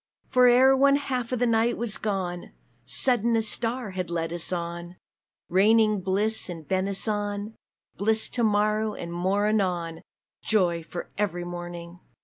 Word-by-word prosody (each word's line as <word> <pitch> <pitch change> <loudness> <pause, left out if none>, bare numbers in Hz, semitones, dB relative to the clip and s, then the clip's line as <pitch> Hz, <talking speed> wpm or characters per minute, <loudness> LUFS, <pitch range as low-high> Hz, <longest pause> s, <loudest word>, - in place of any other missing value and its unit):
For 250 -1 +5
ere 260 +2 +6
one 275 +1 +4
half 255 -4 -3
of 255 - 0
the 245 - +1
night 230 0 +2
was 230 -3 -1
gone, 185 -4 -3 0.3
Sudden 235 - +2
a 225 - +1
star 230 0 -1
has 185 -2 -4
led 165 -1 -2
us 175 +1 -2
on, 170 0 -5 0.5
Raining 215 +2 +3
bliss 200 +3 0
and 165 -4 -8
benison 205 +2 -2 0.4
Bliss 220 +2 +2
to 240 - -1
morrow 215 0 +1
and 170 0 -7
more 190 +4 0
anon, 180 -6 -1 0.4
Joy 180 -6 +1
for 175 +2 -8
every 175 -4 -1
morning! 175 0 -8
205 Hz, 145 wpm, -26 LUFS, 175-225 Hz, 0.5 s, ere